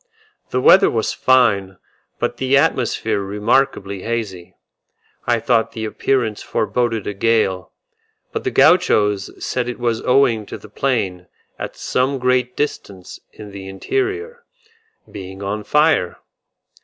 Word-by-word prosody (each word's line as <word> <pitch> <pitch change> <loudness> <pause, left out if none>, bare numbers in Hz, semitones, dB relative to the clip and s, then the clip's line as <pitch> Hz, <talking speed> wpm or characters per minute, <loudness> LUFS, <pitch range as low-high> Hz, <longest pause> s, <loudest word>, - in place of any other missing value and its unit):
The 125 - 0
weather 190 +9 +6
was 110 -2 -1
fine, 100 -8 +2 0.4
but - - -2
the 130 +1 +2
atmosphere 115 -7 0
remarkably 100 -1 0
hazy; 95 -6 -4 0.7
I 120 -1 +2
thought 115 0 +1
the 110 -1 -4
appearance 110 -1 -1
foreboded 115 -1 -1
a 105 - -3
gale, 100 -3 0 0.6
but - - -4
the - - 0
Gauchos 105 -2 +3
said 125 -1 -2
it 125 - -5
was 120 -2 -1
owing 120 -5 +2
to - - -7
the 110 - -14
plain, 100 -8 -2 0.3
at - - -6
some 135 +2 -1
great 125 -1 0
distance 100 -10 -4
in 105 -1 -11
the 95 -1 -9
interior, 400 - -3 0.7
being 95 0 -8
on 105 +2 -3
fire. 150 - +2
115 Hz, 130 wpm, -19 LUFS, 100-130 Hz, 0.7 s, weather